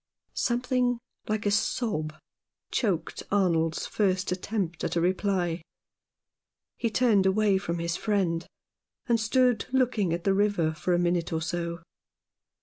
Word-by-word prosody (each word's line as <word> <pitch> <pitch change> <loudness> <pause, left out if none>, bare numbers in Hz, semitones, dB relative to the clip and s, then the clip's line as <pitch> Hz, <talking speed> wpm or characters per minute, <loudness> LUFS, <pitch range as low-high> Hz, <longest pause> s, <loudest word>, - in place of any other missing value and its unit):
Something 245 0 +1 0.3
like 215 -1 -1
a 205 - +2
sob 155 -7 0 0.6
choked 195 -9 -1
Arnold's 170 -5 +2
first 185 -3 0
attempt 180 -2 -2
at - - -1
a - - +3
reply; 180 -1 0 1.1
he 235 - -1
turned 215 -5 +3
away 200 0 +3
from 170 -3 -3
his 170 0 -2
friend, 185 -6 0 0.6
and 235 -2 +2
stood 245 0 +2
looking 245 -8 +2
at 170 +1 -2
the 195 - +3
river 195 -6 +2
for 175 +3 0
a - - +2
minute 175 -1 0
or 160 -1 -1
so. 170 0 -3
190 Hz, 135 wpm, -27 LUFS, 170-215 Hz, 1.1 s, a